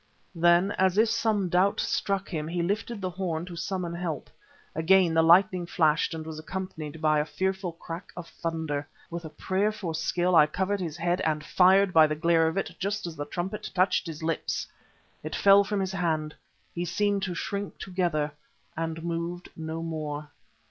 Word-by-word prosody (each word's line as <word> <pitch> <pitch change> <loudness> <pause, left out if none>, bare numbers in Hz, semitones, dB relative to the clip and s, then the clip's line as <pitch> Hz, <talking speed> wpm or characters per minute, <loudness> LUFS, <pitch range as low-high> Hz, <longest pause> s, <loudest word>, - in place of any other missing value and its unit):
Then 175 +3 +4
as 190 0 +3
if 220 +1 +5
some 220 -4 +1
doubt 180 +3 +2
struck 195 -2 -1
him 155 -3 -3
he 170 +1 -1
lifted 205 +4 -2
the 185 - -1
horn 175 -3 -3
to 180 -1 -8
summon 175 0 -3
help. 170 -4 -4 0.4
Again 175 +2 +4
the 160 - +5
lightning 175 +1 +5
flashed 160 -1 +2
and 160 -1 -6
was 160 -1 -6
accompanied 160 -3 -6
by 155 -1 +4
a - - +2
fearful 190 +1 -2
crack 165 +2 -8
of 175 -1 -6
thunder. 160 -4 -3 0.2
With 170 0 -5
a - - -6
prayer 190 +7 0
for 195 -6 -5
skill, 175 +3 +1
I 150 -2 +7
covered 190 +5 -1
his 165 -4 -4
head 175 +1 0
and 155 -1 0
fired 190 +1 +5
by 160 -1 +7
the 155 - -2
glare 165 0 +3
of 160 +4 -2
it 195 - -2
just 200 +1 -2
as 170 -2 -5
the 145 - -4
trumpet 185 +7 -4
touched 185 0 +2
his 160 -1 -7
lips. 165 0 -1 0.6
It - - -5
fell 200 0 +6
from 205 0 -2
his 190 -1 -1
hand. 160 -5 -1 0.4
He 175 - -2
seemed 200 +3 0
to 185 -2 -2
shrink 200 +3 -4
together, 175 -6 -1 0.4
and 165 0 -3
moved 170 +1 -4
no 160 0 -5
more. 150 -2 -4
175 Hz, 185 wpm, -27 LUFS, 160-190 Hz, 0.6 s, I